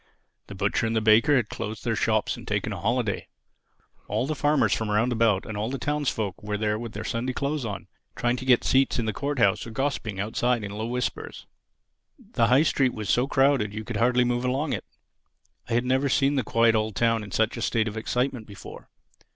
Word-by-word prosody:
The 100 - -9
butcher 100 +3 0
and 115 - -1
the - - +3
baker 110 +7 +5
had 120 -5 +2
closed 110 0 -6
their - - 0
shops - - +1
and - - -12
taken - - -1
a - - -6
holiday. 115 -2 -1 0.8
All - - -1
the 155 - -2
farmers 145 0 +2
from 110 -1 -2
round 115 +4 +2
about, 110 -4 +2
and 110 - -6
all 105 +2 -2
the 135 - -3
townsfolk, 135 -9 -2
were 105 0 -3
there 105 0 -1
with 115 -1 -7
their 105 - -5
Sunday 125 +3 -2
clothes 140 0 -2
on, 105 -3 -5 0.3
trying 120 0 0
to 130 - -7
get 125 -2 +4
seats 135 +1 +2
in 115 - -1
the 110 - -1
Court 140 +5 -3
house 115 -2 +2
or - - -6
gossipping 115 -5 -2
outside 115 +3 0
in 100 - -5
low 110 +2 -4
whispers. 125 +1 -4 0.7
The 115 - 0
High 130 +5 +5
Street 135 -5 +1
was 110 -2 -2
so 125 +2 +2
crowded 135 -7 +2
you 110 - -4
could - - -4
hardly 125 +1 +3
move 120 0 0
along 135 +4 -1
it. - - -4 0.8
I - - -2
had 120 +1 +1
never 130 +2 +1
seen 135 +2 +2
the 135 - +1
quiet 115 0 +3
old 110 -2 -1
town 115 +2 +1
in 105 - -9
such 110 +3 0
a 115 - -6
state 115 -1 +1
of 105 - -5
excitement 125 +1 -2
before. 100 -2 -11
115 Hz, 220 wpm, -26 LUFS, 110-130 Hz, 0.8 s, baker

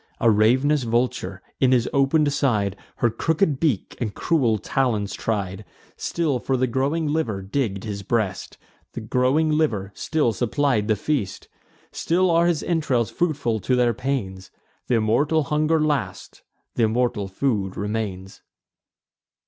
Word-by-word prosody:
A 115 - +4
rav'nous 130 +8 +3
vulture, 115 -5 -1 0.2
in 130 -1 +3
his 125 -2 +3
open'd 145 +1 +3
side, 105 -9 +1 0.2
Her 120 - +1
crooked 155 - 0
beak 140 - 0
and 110 -4 -3
cruel 130 -10 +1
talons 110 -4 -1
tried; 100 -2 -3 0.3
Still 155 -7 -1
for 130 +2 -1
the 130 - +2
growing 135 +6 0
liver 145 -11 -1
digg'd 100 -2 -2
his 105 -2 -5
breast; 100 -3 -2 0.4
The - - -5
growing 130 +7 +1
liver 115 -11 0
still 150 -4 0
supplied 120 -3 0
the 110 - +3
feast; 105 -4 -3 0.4
Still 180 +2 +1
are 170 +1 +4
his 170 -3 0
entrails 140 -9 0
fruitful 145 -10 -1
to 125 +5 0
their 120 -1 +3
pains: 110 -7 -3 0.4
Th' - - 0
immortal 120 +8 +2
hunger 155 +2 +1
lasts, 150 -4 -2 0.3
th' - - -7
immortal 115 -2 +1
food 95 -2 -1
remains. 100 -3 -4
125 Hz, 140 wpm, -23 LUFS, 105-150 Hz, 0.4 s, A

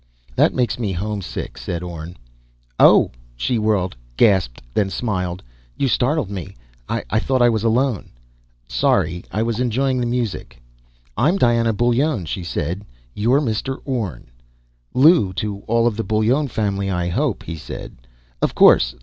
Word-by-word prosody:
"That - - +4
makes 125 -1 0
me 105 -5 -1
homesick," 100 +1 -4
said 85 0 -4
Orne. 85 0 -7 0.6
"Oh!" - - +6 0.2
She 110 - 0
whirled, 105 -6 0 0.2
gasped, 95 - +3
then 100 -2 +1
smiled. 90 -5 -3 0.3
"You 140 - +1
startled 130 -2 +1
me. 95 -6 -6 0.3
I 110 - -1
thought 130 +1 +1
I 120 - +6
was 110 -2 0
alone." 115 -1 +1 0.6
"Sorry. 80 +8 +1
I 105 +5 0
was 115 0 -2
enjoying 130 +2 +1
the 120 - 0
music." 120 - -3 0.6
"I'm 155 - +3
Diana 115 -6 +3
Bullone," 120 - +1
she 90 +3 -4
said. 85 +4 -3 0.3
"You're 120 +7 +2
Mr. 130 +1 -2
Orne." 105 - -4 0.6
"Lew 135 - +5
to 100 +1 -3
all 115 +1 +2
of 120 -3 +1
the 115 - -1
Bullone 115 +7 +1
family, 100 -3 -1
I 90 -2 -1
hope," 85 - -1
he 80 - -6
said. 80 - -8 0.5
"Of - - 0
course - - +6
110 Hz, 150 wpm, -20 LUFS, 90-120 Hz, 0.6 s, Oh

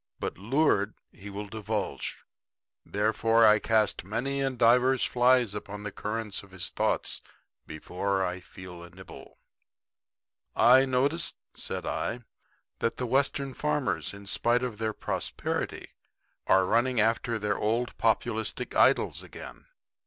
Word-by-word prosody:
But - - -3
lured, 110 - +1 0.2
he 100 +2 -10
will 100 +1 -5
divulge. 105 0 -4 0.6
Therefore 115 +2 +2
I 105 0 +6
cast 110 -1 +1
many 125 +8 -2
and 135 -2 -1
divers 125 +3 +4
flies 125 -3 +3
upon 105 0 -7
the 105 - -4
current 105 0 -3
of 100 - -16
his 90 -1 -3
thoughts - - -1 0.5
before 95 +5 -2
I 90 0 -3
feel 90 -1 -11
a 85 - -11
nibble. - - -13 1.2
"I 130 +2 +6
notice," 140 +6 0 0.2
said - - -5
I, 120 +1 -2 0.6
"that 115 - -1
the 125 - -2
Western 135 +1 0
farmers, 125 - -1
in 100 0 -11
spite 120 +5 +1
of 115 -4 -4
their 110 -1 -1
prosperity, - - -3 0.6
are 95 0 +5
running 120 +4 +2
after 115 +1 +1
their 105 -1 -1
old 115 +3 0
populistic 110 -1 0
idols - - +3
again." - - -11
110 Hz, 130 wpm, -28 LUFS, 100-125 Hz, 1.2 s, I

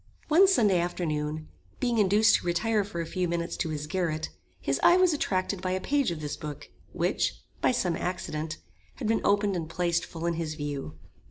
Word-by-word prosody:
One 355 +6 +7
Sunday 210 - +4
afternoon, 155 -3 -2 0.3
being 240 -3 +1
induced 210 +2 +5
to - - -7
retire 210 +5 +1
for 175 -4 -4
a - - -3
few 180 +2 -1
minutes 170 0 -2
to 165 - -1
his 150 -1 -3
garret, 160 -1 -1 0.3
his 135 0 -1
eye 350 - +7
was 365 -2 +4
attracted 190 -8 -1
by 185 0 -1
a 185 - 0
page 280 +4 +1
of 165 -3 -4
this 150 -1 -3
book, 150 -1 -7 0.2
which, - - 0 0.3
by - - +4
some 180 -9 0
accident, 160 -3 -3 0.4
had 240 - -4
been 225 0 +2
opened 205 -1 +2
and 165 -2 -3
placed 170 0 0
full 165 0 -6
in 170 - +1
his 160 -2 -3
view. 145 - -5
175 Hz, 195 wpm, -28 LUFS, 155-205 Hz, 0.4 s, One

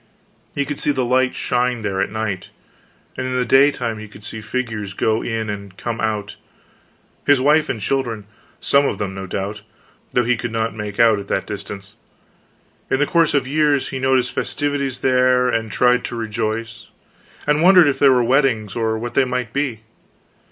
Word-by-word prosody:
He 140 - 0
could 145 0 -4
see - - 0
the 130 -3 -1
lights 130 +1 +2
shine 125 -2 0
there 95 -2 -1
at 100 - 0
night, 110 -4 -4 0.7
and 130 - -3
in 130 0 -1
the 125 - +1
daytime 125 -3 +3
he 110 - -8
could 100 0 -15
see 110 0 -6
figures 110 -3 -4
go 110 +2 +1
in 115 -1 -3
and 100 -2 -7
come 120 -1 -4
out 105 -2 -2 0.9
his 145 -2 +4
wife 150 +3 +3
and 115 - -2
children, 115 -2 -2 0.3
some 140 0 +3
of - - -2
them, 95 -1 -3
no 95 0 -6
doubt, 100 +3 -4 0.5
though 125 - +2
he 120 +1 +1
could 120 0 -4
not 115 -1 -1
make 105 0 -6
out 115 -3 +5
at 100 - -8
that 95 - -1
distance. 100 -1 -8 1.0
In - - +2
the 145 - +2
course 165 -1 +2
of 140 - +2
years 145 -1 +1
he 130 - -4
noted 130 -1 +2
festivities 140 0 -2
there, 125 -1 +3
and 115 -2 -1
tried 125 +3 +3
to 120 - -5
rejoice, 115 0 -4 0.6
and 150 +1 +2
wondered 180 -2 +7
if 140 - 0
they 140 - +6
were 125 -2 +4
weddings 120 -5 +1
or 110 -1 0
what 120 +2 -5
they - - +4
might 125 -2 -3
be. 135 -6 -2
120 Hz, 185 wpm, -20 LUFS, 110-130 Hz, 1.0 s, wondered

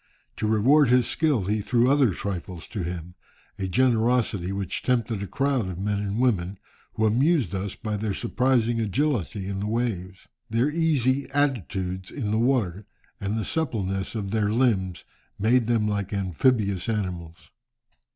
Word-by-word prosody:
To 110 - -1
reward 125 +6 +4
his 125 -1 +4
skill, 150 -10 +1
he 105 +3 0
threw 120 +3 +2
other 140 -2 +4
trifles 90 -2 -5
to 105 - -4
him, 90 0 -5 0.5
a 95 - -1
generosity 115 -4 +2
which 100 -2 -3
tempted 115 -4 0
a 100 - -4
crowd 135 -4 0
of 90 - -6
men 100 +1 -1
and 100 0 -2
women, 100 -7 +1 0.4
who 110 - +1
amused 125 - +2
us 95 +1 -3
by 105 -1 -3
their 105 -1 -2
surprising 120 0 +1
agility 110 - -1
in 100 -1 -3
the 105 - -2
waves. 105 -5 -3 0.2
Their 115 +6 +1
easy 140 -5 +1
attitudes 95 - -1
in 110 -8 -3
the 110 - +1
water, 110 -6 0 0.3
and 100 +1 -2
the 110 - -2
suppleness 100 -11 -2
of 100 -3 -3
their 105 -2 +1
limbs, 100 -7 +1 0.3
made 115 +3 +3
them 115 -3 +2
like 100 -2 -2
amphibious 100 - +1
animals." 85 -6 -4
110 Hz, 155 wpm, -25 LUFS, 95-125 Hz, 0.5 s, reward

